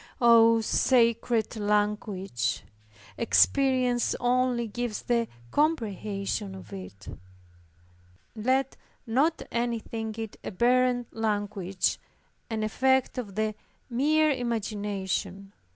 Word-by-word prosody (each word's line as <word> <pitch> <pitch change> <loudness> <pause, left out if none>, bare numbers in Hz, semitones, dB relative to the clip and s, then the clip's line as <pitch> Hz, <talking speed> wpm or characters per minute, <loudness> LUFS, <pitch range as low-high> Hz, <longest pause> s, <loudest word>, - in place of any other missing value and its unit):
Oh, 230 -2 +6
sacred 230 -1 +2
language! 205 - -1 0.6
Experience 255 0 +3
only 245 -1 +1
gives 235 0 -4
the 235 -1 +1 0.2
comprehension 205 - -1
of 95 +2 -11
it! 95 +1 -10 1.3
Let 260 +4 0 0.3
not 275 +8 +1
any 235 0 0
think 220 0 -6
it 225 -2 -6
a - - -4
barren 245 +4 +2
language, 205 -4 -1 0.5
and 220 -1 -2
effect 260 +4 +1
of 205 -6 -7
the 215 0 0 0.4
mere 305 +5 +3
imagination. 205 -5 -3
225 Hz, 90 wpm, -27 LUFS, 205-245 Hz, 1.3 s, Oh